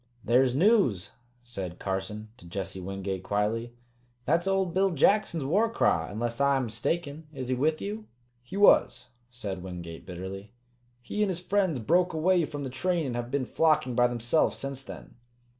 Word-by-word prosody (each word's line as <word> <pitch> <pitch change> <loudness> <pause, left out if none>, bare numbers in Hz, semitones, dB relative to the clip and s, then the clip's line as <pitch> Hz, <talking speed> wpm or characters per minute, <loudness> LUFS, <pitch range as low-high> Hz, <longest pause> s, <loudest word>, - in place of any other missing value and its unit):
"There's 125 +1 +3
news!" 165 - +3 0.3
said 95 -8 -6
Carson 100 +3 -4
to 105 - -15
Jesse 95 +1 -4
Wingate 95 0 -4
quietly. 110 +5 -1 0.5
"That's 170 +3 +1
old 190 -3 +1
Bill 195 +1 +3
Jackson's 170 0 +2
war 200 +12 +2
cry, 80 - +1
unless 115 +5 -3
I 140 0 +4
am 135 - 0
mistaken. 145 +7 -3
Is 130 -2 -5
he - - +2
with 155 +5 +1
you?" 215 +2 -5 0.3
"He 125 +10 -8
was," 200 -10 +4 0.2
said 105 -7 -6
Wingate 90 -2 -8
bitterly. 95 +3 -7 0.5
"He 210 +12 -3
and 210 - +2
his 180 -2 -2
friends 185 -3 +1
broke 175 +9 +2
away 170 +2 +3
from 145 -2 -6
the 130 - -5
train 170 +4 0
and 125 -3 -3
have 120 0 -3
been 140 0 -1
flocking 155 -3 +2
by 120 0 +4
themselves 120 +5 +1
since 135 -1 -3
then." 135 - -11
130 Hz, 170 wpm, -28 LUFS, 105-170 Hz, 0.5 s, I